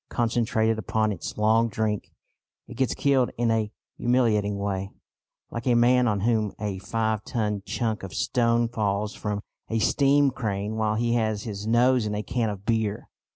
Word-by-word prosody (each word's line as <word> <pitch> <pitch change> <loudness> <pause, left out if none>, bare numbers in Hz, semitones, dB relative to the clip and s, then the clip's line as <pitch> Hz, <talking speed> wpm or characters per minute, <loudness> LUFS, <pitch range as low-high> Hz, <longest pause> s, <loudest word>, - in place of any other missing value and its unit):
Concentrated 115 -2 +1
upon 110 +1 0
its 95 - -6
long 110 +2 +3
drink, 105 -1 -2 0.6
it - - -9
gets 130 -2 0
killed 135 -3 +2
in 120 -1 +1
a 110 -2 0 0.3
humiliating 110 -5 +2
way, 100 -1 -2 0.6
like 115 +2 -5
a 120 - +4
man 125 +1 +4
on 105 -3 0
whom 110 -2 +1
a 100 -3 -3
five 110 +1 -1
ton 105 -4 -2
chunk 110 -3 -1
of 95 - -7
stone 120 -1 +1
falls 105 -2 -1
from 105 -1 -3 0.3
a 115 - 0
steam 140 +4 +3
crane 105 -3 -3
while 110 -1 0
he 115 +1 +1
has 110 -3 0
his 105 -1 -5
nose 120 0 +3
in 105 - -2
a 105 - -2
can 115 -1 -1
of 100 -1 -7
beer. 110 -3 -1
110 Hz, 170 wpm, -26 LUFS, 105-120 Hz, 0.6 s, a